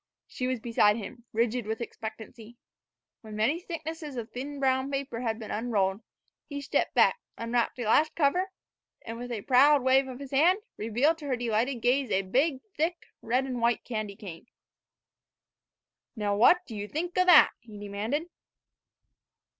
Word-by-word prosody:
She 255 - -4
was 255 -1 -1
beside 220 -3 +3
him, 235 +2 -9
rigid 230 0 0
with 220 0 -3
expectancy. 225 0 -8 0.6
When 215 -2 -9
many 230 +10 +1
thicknesses 320 -4 -6
of 230 -2 -6
thin 280 +3 -6
brown 260 0 +1
paper 275 -4 -3
had 225 -3 -1
been 220 -2 -8
unrolled, 210 -3 0 0.5
he 285 -1 -5
stepped 280 - -1
back, - - +4 0.2
unwrapped 235 +1 -1
a 245 - -3
last 300 +8 +3
cover, 350 +5 +2 0.5
and, 230 0 -7
with 245 0 -6
a 215 -4 -4
proud 275 +2 +5
wave 265 +1 +4
of 255 -1 -7
his 275 -1 -9
hand, 325 +7 +4 0.2
revealed 245 +10 +1
to 295 - -7
her 260 - +1
delighted 240 +1 -1
gaze 255 +1 +2
a 195 -1 +1
big, 265 - +1
thick, 335 +3 -2
red 250 +4 +1
and 250 -3 -4
white 235 -1 +1
candy 215 -4 -4
cane. 190 -1 -10 1.7
"Now, 205 -2 -1
what 350 - +5
do 225 - -9
ye 205 0 -5
think 340 +8 -4
o' - - +6
that?" 350 -4 +8
he 220 -3 -13
demanded. 205 +9 -3
245 Hz, 165 wpm, -28 LUFS, 220-280 Hz, 1.7 s, that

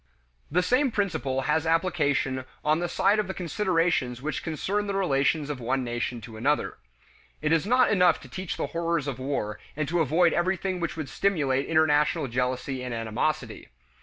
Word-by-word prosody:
The 180 +5 +2
same 255 +8 +3
principle 165 - -1
has 150 +3 0
application 150 -6 +1 0.2
on 155 +2 +3
the 175 0 -2
side 205 +5 +2
of 210 - 0
the 190 - -5
considerations 170 - 0
which 155 +4 -3
concern 195 +6 -2
the 200 - -2
relations 150 -4 +1
of 140 - -5
one 130 +2 -1
nation 120 0 -3
to 110 0 -10
another. 145 +6 0 0.6
It 155 +1 -1
is 165 +3 +2
not 250 +1 +4
enough 180 -4 +4
to - - -12
teach 185 -2 -5
the - - -1
horrors 170 -3 0
of 135 -2 -4
war 105 -6 -3 0.2
and 155 0 -2
to 175 +1 +1
avoid 165 +3 +3
everything 185 +1 0
which 170 -1 -3
would 155 -3 -4
stimulate 140 -4 0
international 150 -3 +3
jealousy 125 +2 -2
and 125 -2 -4
animosity. 115 +7 -2
155 Hz, 175 wpm, -27 LUFS, 130-180 Hz, 0.6 s, not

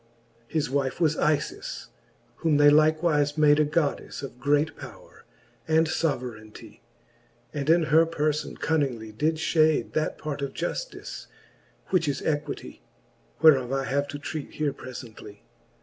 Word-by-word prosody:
His 155 +2 -1
wife 135 +2 -1
was 160 -3 +2
Ifis^ 150 -2 -1 0.5
whom 160 -3 +2
they 145 0 +7
likewife 155 -1 +3
made 150 -1 +5
A 150 - +4
Goddeflfe 150 -2 -2
of 130 -2 -8
great 145 +3 +1
powre - - -12 0.5
and 160 +1 +4
foverainty, 125 -9 -4 0.7
And 145 0 -3
in 170 +1 +5
her 160 +1 +4
perfon 155 -2 -2
cunningly 130 -9 -1
did 150 +9 0
fhade 155 -1 +2
That 155 - -1
part 150 -2 -5
of 140 -1 -3
jaftice, - - -5 0.6
which 175 -4 +2
is 140 - -2
Equity, 150 -1 -3 0.6
Whereof 135 -6 +6
I 135 0 0
have 140 +2 -1
to 145 - -6
treat 145 0 -6
here 150 -2 -1
prelently. 115 -4 -10
150 Hz, 135 wpm, -26 LUFS, 140-155 Hz, 0.7 s, they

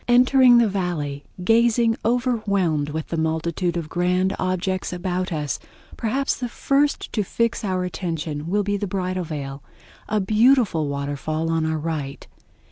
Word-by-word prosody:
Entering 250 0 +6
the 235 -1 +5
Valley, 170 -8 -3 0.2
gazing 230 +2 +3
overwhelmed 200 - +1
with 155 +1 -4
the 165 - -2
multitude 165 +2 -1
of 165 -3 -3
grand 180 +3 +1
objects 185 0 -1
about 180 +1 -2
us, 150 -3 -2 0.4
perhaps 265 +4 0
the 245 -1 -4
first 280 +4 0
to 215 - +1
fix 230 +4 -1
our 185 -2 -1
attention 165 -4 -4
will 205 +4 +1
be 205 0 0
the 205 - -3
Bridal 185 -1 -2
Veil, 140 -3 -5 0.5
a 215 0 +1
beautiful 215 - +3
waterfall 145 +3 -2
on 160 -1 +1
our 160 0 0
right. 150 -3 -4
180 Hz, 145 wpm, -23 LUFS, 160-220 Hz, 0.5 s, Entering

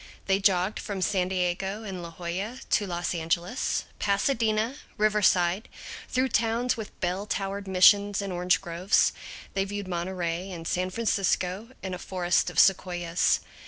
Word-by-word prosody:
They 195 0 +2
jogged 195 0 +2
from 200 -2 -4
San 185 -2 +1
Diego 190 +3 -1
and 190 -4 -6
La 170 - -7
Jolla 180 +8 -5
to 210 -2 +2
Los 175 0 -2
Angeles, 170 +7 -1 0.2
Pasadena, 220 +3 +1 0.2
Riverside, 205 -2 +2 0.4
through 255 +1 +1
towns 230 +2 +1
with 220 -2 -8
bell 185 +3 -1
towered 195 0 -3
missions 200 +2 +5
and 200 -2 -3
orange 180 0 +2
groves; 175 +2 +2 0.4
they 195 - +1
viewed 200 0 -5
Monterey 175 0 -3
and 165 -3 -6
San 185 +1 0
Francisco 195 -1 0
and 190 -1 -4
a 180 - -5
forest 180 -2 0
of - - -10
sequoias. 175 -3 +3
190 Hz, 145 wpm, -27 LUFS, 180-210 Hz, 0.4 s, missions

